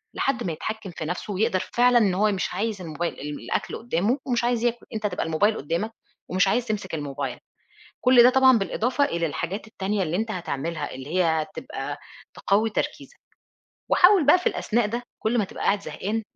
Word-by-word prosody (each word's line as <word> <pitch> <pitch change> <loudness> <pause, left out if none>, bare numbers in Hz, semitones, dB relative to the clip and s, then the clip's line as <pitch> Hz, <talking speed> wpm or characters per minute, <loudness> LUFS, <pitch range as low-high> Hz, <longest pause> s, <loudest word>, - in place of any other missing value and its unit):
لحد 250 -3 0
ما 175 - -2
يتحكم 215 +3 -5
في 160 - -6
نَفسه 180 +5 -4
ويقدر 205 -1 +1
فعلًا 245 0 +5
إن 205 -5 +3
هو 210 +3 +2
مش 190 -2 -2
عايز 205 0 -2
الموبايل 165 +1 -4 0.2
الأكل - - -3
قدامه 225 - 0
ومش 240 -2 +1
عايز 240 -1 +1
ياكل، 240 0 -1
أنت 215 -1 -1
تبقى 180 - -3
الموبايل 205 +7 +2
قدّامك 170 +10 -2 0.4
ومش 190 +2 +3
عايز 240 +4 +1
تمسك 200 -5 -3
الموبايل. 145 -2 -4 0.6
كل 250 -1 +7
ده 250 - +8
طبعًا 260 -1 +6
بالإضافة 245 +8 0
إلى 170 -6 -1
الحاجات 170 +8 -4
التانية 200 -2 -2
اللي 170 +2 -1
أنت 220 0 -2
هتعملها 160 -3 -3
اللي 135 +6 -6
هي 180 - +4
هتبقى 155 -2 -2 0.4
تقوي 215 +3 +2
تركيزك. 485 - -4 0.7
وحاول 360 -4 +6
بقى 325 +5 +7
في 365 - -9
الأثناء 240 - 0
ده 235 +3 -3 0.2
كل 230 +2 +1
ما 210 - +2
تبقى - - -7
قاعد 200 0 +2
زهقان 220 +4 -3
210 Hz, 185 wpm, -25 LUFS, 175-235 Hz, 0.7 s, ده